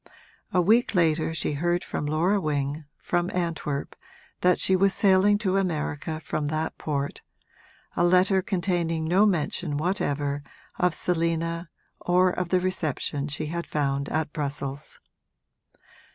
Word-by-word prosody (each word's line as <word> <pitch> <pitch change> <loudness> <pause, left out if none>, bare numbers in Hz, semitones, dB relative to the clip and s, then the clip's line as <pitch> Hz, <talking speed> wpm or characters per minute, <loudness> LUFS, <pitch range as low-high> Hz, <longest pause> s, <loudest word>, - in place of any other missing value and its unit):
A 185 - +2
week 220 +4 +3
later 160 -2 +2
she 160 - -1
heard 175 +4 0
from 145 - -3
Laura 175 +7 +2
Wing, 145 -1 -2
from 175 0 -1
Antwerp, 165 -5 -3 0.4
that 180 0 +3
she 190 - +3
was 195 +1 +3
sailing 200 +1 +4
to 195 -2 0
America 160 -3 -2
from 150 -2 -2
that 155 +1 -2
port 140 -2 -3 0.7
a - - +2
letter 185 +2 +4
containing 175 -4 -1
no 190 +6 +4
mention 155 -3 -1
whatever 145 -4 -1 0.4
of 180 -2 +2
Selina 165 0 -1 0.3
or 180 +1 +3
of 180 -1 -3
the 185 - +3
reception 155 -5 -2
she 150 +1 -3
had 170 +3 -4
found 140 -2 -1
at 155 0 -2
Brussels. 140 -1 -4
165 Hz, 135 wpm, -26 LUFS, 150-180 Hz, 0.7 s, sailing